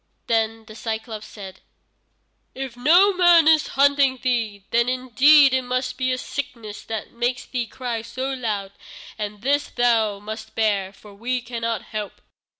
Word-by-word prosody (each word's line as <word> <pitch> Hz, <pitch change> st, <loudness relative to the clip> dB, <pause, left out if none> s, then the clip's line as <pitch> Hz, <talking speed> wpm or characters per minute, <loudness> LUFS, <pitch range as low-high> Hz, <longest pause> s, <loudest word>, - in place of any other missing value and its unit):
Then 225 Hz, -2 st, 0 dB
the 215 Hz, -, -12 dB
Cyclôpes 220 Hz, 0 st, -5 dB
said: 195 Hz, -4 st, -11 dB, 1.0 s
"If 265 Hz, -2 st, -6 dB
no 345 Hz, +11 st, +5 dB
man 350 Hz, -3 st, +5 dB
is 315 Hz, -1 st, +5 dB
hurting 280 Hz, -1 st, +4 dB
thee, 225 Hz, -6 st, -1 dB
then 235 Hz, +1 st, +2 dB
indeed 260 Hz, +3 st, +5 dB
it 260 Hz, -, +2 dB
must 255 Hz, +1 st, -2 dB
be 255 Hz, -1 st, -1 dB
a 255 Hz, -, 0 dB
sickness 240 Hz, -7 st, -6 dB
that 220 Hz, -1 st, -5 dB
makes 245 Hz, +1 st, -2 dB
thee 245 Hz, -3 st, -3 dB
cry 245 Hz, -3 st, -4 dB
so 255 Hz, +4 st, -4 dB
loud, 210 Hz, -6 st, -3 dB, 0.5 s
and 210 Hz, 0 st, -5 dB
this 285 Hz, +2 st, +1 dB
thou 225 Hz, -4 st, +1 dB
must 220 Hz, +2 st, -8 dB
bear, 205 Hz, -4 st, 0 dB
for 205 Hz, +1 st, -16 dB
we 245 Hz, +5 st, -2 dB
cannot 230 Hz, -2 st, -4 dB
help." 210 Hz, -2 st, -6 dB
240 Hz, 155 wpm, -22 LUFS, 220-260 Hz, 1.0 s, no